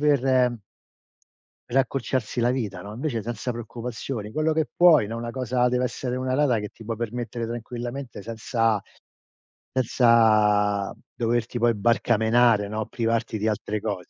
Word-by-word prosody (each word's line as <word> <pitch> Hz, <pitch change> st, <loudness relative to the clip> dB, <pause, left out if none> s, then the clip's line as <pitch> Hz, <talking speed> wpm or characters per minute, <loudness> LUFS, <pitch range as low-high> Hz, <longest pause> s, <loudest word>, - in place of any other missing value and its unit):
per 145 Hz, -3 st, +3 dB, 1.5 s
per 135 Hz, -, +2 dB
accorciarsi 130 Hz, -3 st, -1 dB
la 120 Hz, -, +3 dB
vita, 105 Hz, -8 st, -3 dB
no, 105 Hz, +1 st, -8 dB
invece 120 Hz, -2 st, -3 dB
senza 120 Hz, +2 st, -4 dB
preoccupazioni, 115 Hz, -1 st, -6 dB
quello 155 Hz, +1 st, +1 dB
che 155 Hz, -1 st, +1 dB
puoi, 165 Hz, -10 st, +6 dB
no, 115 Hz, +2 st, -5 dB
una 120 Hz, 0 st, -4 dB
cosa 125 Hz, -1 st, 0 dB
deve 125 Hz, +1 st, +1 dB
essere 125 Hz, +1 st, -3 dB
una 130 Hz, 0 st, -1 dB
rata 135 Hz, -5 st, +3 dB
che 105 Hz, -1 st, -5 dB
ti 115 Hz, -, -15 dB
può 115 Hz, 0 st, -3 dB
permettere 120 Hz, 0 st, -4 dB
tranquillamente 120 Hz, 0 st, -6 dB
senza 115 Hz, -1 st, 0 dB, 0.9 s
senza 110 Hz, -5 st, +3 dB, 0.2 s
doverti 120 Hz, 0 st, -1 dB
poi 120 Hz, -1 st, +3 dB
barcamenare, 115 Hz, 0 st, +3 dB
no, 110 Hz, +1 st, -3 dB
privarti 115 Hz, -1 st, -1 dB
di 110 Hz, +2 st, -1 dB
altre 105 Hz, 0 st, -2 dB
cose. 100 Hz, -4 st, -4 dB
115 Hz, 145 wpm, -25 LUFS, 110-125 Hz, 1.5 s, puoi